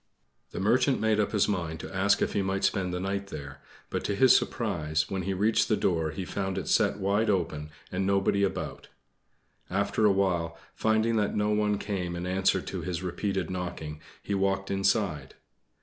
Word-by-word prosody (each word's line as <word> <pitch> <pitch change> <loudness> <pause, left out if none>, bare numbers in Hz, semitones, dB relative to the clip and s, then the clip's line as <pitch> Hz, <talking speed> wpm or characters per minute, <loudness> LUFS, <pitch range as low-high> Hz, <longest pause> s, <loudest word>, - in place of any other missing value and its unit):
The - - -6
Merchant 125 +7 +3
made 110 -1 +2
up 105 - +1
his 105 -3 +2
mind 85 -6 -2
to - - -8
ask 100 +1 +3
if - - -1
he 100 - +1
might 95 0 -1
spend 95 -2 +1
the 90 - -2
night 100 +1 -2
there; 70 -6 -8 0.3
but - - -2
to 100 - 0
his 130 +5 +6
surprise, 75 0 0
when 95 -1 -1
he 95 +2 -2
reached 105 +4 +2
the 110 - +3
door 80 -3 +1
he 90 +4 -5
found 95 0 -3
it - - -3
set - - +3
wide 100 +3 +1
open, 80 -6 -1 0.2
and 95 +1 -1
nobody 100 +1 +2
about. 100 - -2 0.8
After 110 - +1
awhile, 90 -4 +1 0.2
finding 110 +1 +2
that 105 -1 0
no 105 0 +1
one 105 -1 +2
came 95 -4 -3
in 85 +1 -4
answer 95 +1 +2
to - - -5
his 90 -1 -3
repeated 95 +1 -2
knocking, 85 -4 -5 0.2
he 100 - -3
walked 95 0 0
inside. 95 -7 0
95 Hz, 185 wpm, -28 LUFS, 90-105 Hz, 0.8 s, his